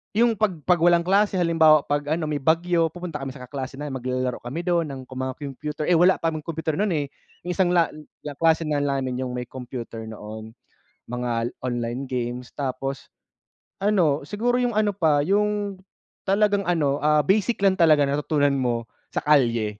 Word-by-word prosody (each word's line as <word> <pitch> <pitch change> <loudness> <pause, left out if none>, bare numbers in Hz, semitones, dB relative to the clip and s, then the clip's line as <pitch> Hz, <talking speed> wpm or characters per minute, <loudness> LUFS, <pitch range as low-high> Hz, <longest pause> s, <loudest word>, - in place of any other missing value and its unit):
yung 230 -1 +3
'pag 210 -4 +1
'pag 180 +2 +3
walang 170 0 +4
klase 200 +2 +2
halimbawa 165 -4 +5
pag 145 0 -2
ano, 155 -2 -3
may 145 - -1
bagyo 165 +3 +2
pupunta 170 -1 -6
kami 135 -1 -6
sa 130 - -9
kaklase 130 0 -6
namin 140 -1 -5
maglalaro 125 0 -2
kami 135 +8 -5
do'n 170 -2 +1
ng 135 -2 -7
mga 130 0 -5
computer, 150 +1 -5
eh, 170 +1 +3
wala 180 +2 +6
pa 165 - -1
computer 160 +1 -3
no'n, 205 -4 +1
eh. 145 -2 0 0.4
Yung 180 - -3
isang 180 -1 +2
la 170 -1 +3 0.3
kaklase 160 +3 +1
na 150 -2 0
namin 135 -3 -1
yung 125 -1 -3
may 125 - -3
computer 125 -2 -7
noon. 110 +1 -9 0.6
Mga 120 -1 -2 0.2
online 120 +2 -3
games 125 -1 -4
tapos 135 0 -4 0.7
ano, 175 -9 +2
siguro 245 +6 0
yung 245 -3 0
ano 210 -1 +2
pa, 155 -7 +2
yung 205 +2 0 0.5
talagang 200 0 +2
ano, 145 -5 +1
ah, 150 0 +3
basic 205 - +1
lang 190 -1 +3
talaga 155 -3 +5
natutunan 145 +1 +1
mo 120 -2 0 0.2
sa - - -3
kalye 115 -8 +2
150 Hz, 175 wpm, -24 LUFS, 130-175 Hz, 0.7 s, wala